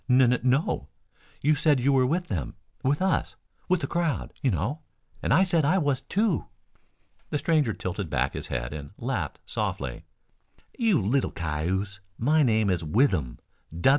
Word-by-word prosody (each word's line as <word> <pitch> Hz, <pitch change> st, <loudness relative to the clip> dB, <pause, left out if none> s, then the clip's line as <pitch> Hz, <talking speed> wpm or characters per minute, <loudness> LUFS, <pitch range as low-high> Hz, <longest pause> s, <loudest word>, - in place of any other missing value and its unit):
"N 125 Hz, +1 st, +6 dB
n 125 Hz, -, +1 dB
no. 130 Hz, +4 st, +1 dB, 0.5 s
You 150 Hz, +3 st, +4 dB
said 150 Hz, -2 st, +3 dB
you 135 Hz, +3 st, +3 dB
were 130 Hz, -1 st, +4 dB
with 175 Hz, +6 st, 0 dB
them 80 Hz, -, -3 dB, 0.3 s
with 145 Hz, +7 st, +1 dB
us 190 Hz, -, 0 dB, 0.3 s
with 185 Hz, -1 st, +3 dB
the -, -, -1 dB
crowd, 170 Hz, -3 st, -1 dB
you 135 Hz, -, +2 dB
know. 110 Hz, -, -1 dB, 0.4 s
And -, -, -1 dB
I 190 Hz, -, +6 dB
said 175 Hz, -4 st, +2 dB
I 160 Hz, +7 st, +3 dB
was 145 Hz, -6 st, +1 dB
too." 205 Hz, -2 st, 0 dB, 0.8 s
The -, -, 0 dB
stranger 150 Hz, -6 st, +2 dB
tilted 95 Hz, -2 st, -4 dB
back 65 Hz, -1 st, 0 dB
his -, -, -5 dB
head -, -, -3 dB
and 75 Hz, +1 st, -8 dB
laughed 115 Hz, -, -3 dB
softly. 65 Hz, -4 st, -3 dB, 0.7 s
"You 225 Hz, -, +3 dB
little 120 Hz, +7 st, +1 dB
cayuse, 90 Hz, +5 st, -2 dB, 0.2 s
my 150 Hz, +7 st, +3 dB
name 110 Hz, -6 st, +3 dB
is 85 Hz, -2 st, -1 dB
Withem. 80 Hz, -, +1 dB
125 Hz, 165 wpm, -27 LUFS, -, 0.8 s, N